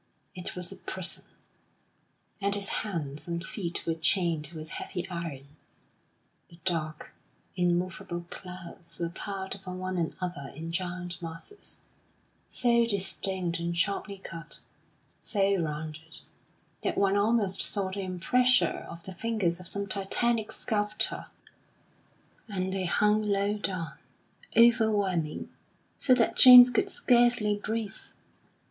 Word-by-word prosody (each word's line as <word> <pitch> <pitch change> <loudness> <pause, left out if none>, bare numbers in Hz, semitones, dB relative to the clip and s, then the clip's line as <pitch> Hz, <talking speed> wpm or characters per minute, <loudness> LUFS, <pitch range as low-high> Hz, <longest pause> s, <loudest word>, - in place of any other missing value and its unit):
It 180 - -6
was 180 -1 -2
a - - -9
prison, 185 -2 0 1.2
and 200 +1 +2
his 200 0 -1
hands 155 -7 -4
and 170 +1 -3
feet 175 -5 -4
were 165 - +1
chained 160 -1 +1
with 155 0 -8
heavy 180 +2 -5
iron.... 160 -6 -6 1.0
The 170 - -16
dark, 155 -4 -2 0.4
immovable 175 -1 -1
clouds 180 -2 -9
were 170 -1 -2
piled 190 +2 -5
upon 185 -2 -7
one 185 0 -3
another 170 -4 -4
in 165 +2 -6
giant 180 0 -3
masses 165 - -7 0.7
so 235 -1 +3
distinct 190 -4 0
and 170 0 -2
sharply 200 +2 0
cut, 165 -4 -7 0.6
so 195 -3 +1
rounded, 155 +1 -6 0.6
that - - -1
one 200 0 +3
almost 205 -2 +2
saw 195 -2 -1
the 200 +1 -3
impressure 190 +3 +2
of 170 0 -9
the 190 - -6
fingers 185 -4 -1
of 180 - -7
some 200 +2 -1
Titanic 215 +3 +1
sculptor; 210 -1 0 1.2
and 190 -2 -2
they 190 -1 -1
hung 210 +4 +3
low 205 0 +1
down, 185 -5 -3 0.6
overwhelming, 210 -9 +3 0.5
so 255 - +5
that 235 - +1
James 250 -1 +11
could 230 - +1
scarcely 240 -4 +3
breathe. 215 0 -4
185 Hz, 120 wpm, -29 LUFS, 170-205 Hz, 1.2 s, James